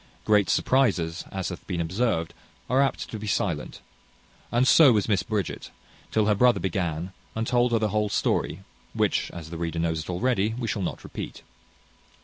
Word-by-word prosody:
Great 105 Hz, -2 st, +4 dB
surprizes, 95 Hz, -11 st, +1 dB
as 95 Hz, -1 st, -3 dB
hath 90 Hz, -, -8 dB
been 90 Hz, -3 st, -2 dB
observed, 85 Hz, -1 st, 0 dB, 0.4 s
are 130 Hz, +2 st, +4 dB
apt 135 Hz, -2 st, 0 dB
to 110 Hz, -, -6 dB
be 105 Hz, -, -6 dB
silent; 85 Hz, -7 st, -2 dB, 0.7 s
and 120 Hz, +3 st, +3 dB
so 150 Hz, -5 st, +8 dB
was 105 Hz, -4 st, +2 dB
Miss 100 Hz, -5 st, +2 dB
Bridget, 105 Hz, 0 st, -3 dB, 0.4 s
till 110 Hz, -1 st, +2 dB
her 105 Hz, -, +4 dB
brother 120 Hz, 0 st, +4 dB
began, 90 Hz, -1 st, -2 dB, 0.2 s
and 115 Hz, 0 st, -1 dB
told 120 Hz, 0 st, +2 dB
her 115 Hz, -, +3 dB
the 110 Hz, -1 st, 0 dB
whole 105 Hz, 0 st, 0 dB
story, 95 Hz, -2 st, 0 dB, 0.3 s
which, -, -, +1 dB
as 80 Hz, -2 st, -9 dB
the 85 Hz, -, -5 dB
reader 85 Hz, 0 st, -3 dB
knows 80 Hz, -1 st, 0 dB
it 75 Hz, -, -7 dB
already, 110 Hz, +2 st, 0 dB
we 120 Hz, -2 st, -3 dB
shall 105 Hz, -, -2 dB
not 90 Hz, -, -4 dB
repeat. -, -, -7 dB
100 Hz, 180 wpm, -26 LUFS, 85-115 Hz, 0.7 s, so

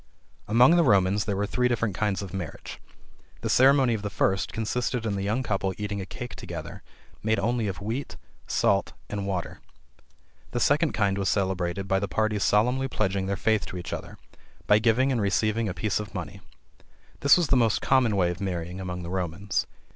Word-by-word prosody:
Among 125 Hz, +9 st, +6 dB
the 170 Hz, -, +5 dB
Romans 100 Hz, -, +3 dB
there 105 Hz, -2 st, -1 dB
were 100 Hz, +1 st, 0 dB
three 125 Hz, +4 st, +1 dB
different 115 Hz, -4 st, 0 dB
kinds 100 Hz, +1 st, -1 dB
of 95 Hz, -, -8 dB
marriage. 90 Hz, -5 st, -6 dB, 0.6 s
The -, -, -1 dB
ceremony 135 Hz, -1 st, +5 dB
of 110 Hz, -, -2 dB
the 105 Hz, -, -3 dB
first 95 Hz, 0 st, 0 dB
consisted 115 Hz, +2 st, -2 dB
in 105 Hz, -, -1 dB
the 100 Hz, -, -2 dB
young 110 Hz, +6 st, -1 dB
couple 95 Hz, -4 st, -1 dB
eating 105 Hz, -1 st, -3 dB
a 95 Hz, -, -7 dB
cake 125 Hz, +3 st, -7 dB
together -, -, -7 dB, 0.4 s
made 110 Hz, +1 st, +1 dB
only 115 Hz, +2 st, 0 dB
of 95 Hz, 0 st, -5 dB
wheat, 115 Hz, +7 st, -4 dB, 0.3 s
salt 100 Hz, 0 st, +1 dB, 0.2 s
and 100 Hz, -1 st, -3 dB
water. 90 Hz, -3 st, -3 dB, 0.9 s
The 120 Hz, -, 0 dB
second 150 Hz, +5 st, +2 dB
kind 100 Hz, -2 st, +1 dB
was 100 Hz, -1 st, 0 dB
celebrated 95 Hz, -1 st, -1 dB
by 95 Hz, 0 st, +2 dB
the 100 Hz, -, -2 dB
parties 105 Hz, 0 st, 0 dB
solemnly 125 Hz, +6 st, +2 dB
pledging 95 Hz, -5 st, -1 dB
their 100 Hz, 0 st, -1 dB
faith 110 Hz, -1 st, +1 dB
to 90 Hz, -, -6 dB
each 90 Hz, -, -6 dB
other, -, -, -7 dB, 0.5 s
by 105 Hz, -, +5 dB
giving 120 Hz, +4 st, +3 dB
and 120 Hz, -4 st, 0 dB
receiving 110 Hz, +2 st, +1 dB
a -, -, -3 dB
piece 105 Hz, +6 st, -1 dB
of 105 Hz, 0 st, -7 dB
money. 85 Hz, -5 st, -6 dB, 0.8 s
This 140 Hz, +3 st, +6 dB
was 175 Hz, -4 st, 0 dB
the -, -, +4 dB
most 115 Hz, -4 st, +3 dB
common 125 Hz, -5 st, +2 dB
way 90 Hz, -3 st, +2 dB
of 90 Hz, +2 st, -8 dB
marrying 90 Hz, -1 st, -4 dB
among 90 Hz, -1 st, -5 dB
the 85 Hz, -, -6 dB
Romans. 95 Hz, +1 st, -2 dB
105 Hz, 195 wpm, -26 LUFS, 95-115 Hz, 0.9 s, Among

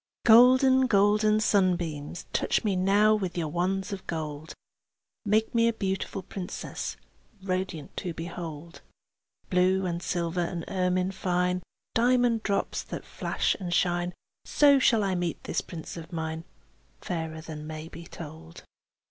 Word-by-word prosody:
Golden, 260 Hz, +3 st, +7 dB
golden 210 Hz, 0 st, +4 dB
sunbeams, 175 Hz, -7 st, 0 dB
Touch -, -, +1 dB
me 205 Hz, -3 st, +1 dB
now 200 Hz, +3 st, +4 dB
with 190 Hz, -5 st, -2 dB
your 160 Hz, -3 st, -1 dB
wands 190 Hz, +5 st, -1 dB
of 195 Hz, -, -8 dB
gold; 155 Hz, -1 st, -5 dB, 0.7 s
Make 215 Hz, +2 st, +2 dB
me 230 Hz, -1 st, +4 dB
a 230 Hz, -, +2 dB
beautiful 195 Hz, -1 st, -3 dB
princess, 180 Hz, -1 st, -6 dB, 0.5 s
Radiant 185 Hz, -5 st, -3 dB
to 180 Hz, -, -3 dB
behold. 165 Hz, -1 st, -7 dB, 0.7 s
Blue 185 Hz, +1 st, +3 dB
and 170 Hz, -1 st, -2 dB
silver 175 Hz, 0 st, -1 dB
and 170 Hz, -1 st, -3 dB
ermine 185 Hz, 0 st, 0 dB
fine, 180 Hz, -1 st, 0 dB, 0.3 s
Diamond 245 Hz, -1 st, +3 dB
drops 200 Hz, -2 st, -1 dB
that -, -, -7 dB
flash -, -, -1 dB
and 180 Hz, -3 st, -4 dB
shine; 175 Hz, 0 st, +1 dB, 0.3 s
So 285 Hz, -2 st, +5 dB
shall 230 Hz, -4 st, +4 dB
I 195 Hz, -1 st, 0 dB
meet 175 Hz, -2 st, -2 dB
this -, -, -1 dB
prince 165 Hz, -3 st, -8 dB
of 165 Hz, +1 st, -9 dB
mine, 160 Hz, -1 st, -4 dB, 0.6 s
Fairer 160 Hz, -2 st, -4 dB
than 155 Hz, -1 st, -8 dB
may 155 Hz, 0 st, -6 dB
be 170 Hz, 0 st, -10 dB
told. 150 Hz, -, -10 dB
180 Hz, 140 wpm, -28 LUFS, 170-205 Hz, 0.7 s, Golden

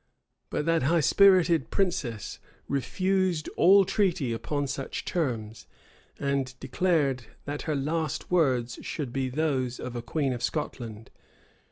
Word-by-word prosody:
[*] -, -, -52 dB
But 150 Hz, -, -2 dB
that 165 Hz, 0 st, +2 dB
high 160 Hz, +5 st, +3 dB
spirited 175 Hz, -4 st, +5 dB
princess 175 Hz, -, -2 dB, 0.3 s
refused 185 Hz, +4 st, 0 dB
all 195 Hz, +3 st, +5 dB
treaty 175 Hz, -, +1 dB
upon 145 Hz, +5 st, -2 dB
such 135 Hz, 0 st, -4 dB
terms, 115 Hz, -10 st, -3 dB, 0.5 s
and 140 Hz, -2 st, -1 dB
declared 140 Hz, -3 st, 0 dB, 0.2 s
that 145 Hz, +1 st, -4 dB
her 155 Hz, -, +1 dB
last 155 Hz, +3 st, -2 dB
words 130 Hz, -9 st, +1 dB
should 140 Hz, -6 st, -5 dB
be 135 Hz, -1 st, -1 dB
those 130 Hz, -3 st, -1 dB
of 125 Hz, -1 st, -6 dB
a 120 Hz, -, -3 dB
queen 135 Hz, +3 st, -1 dB
of 120 Hz, -, -5 dB
Scotland. 115 Hz, -1 st, -4 dB
140 Hz, 135 wpm, -27 LUFS, 125-170 Hz, 0.5 s, spirited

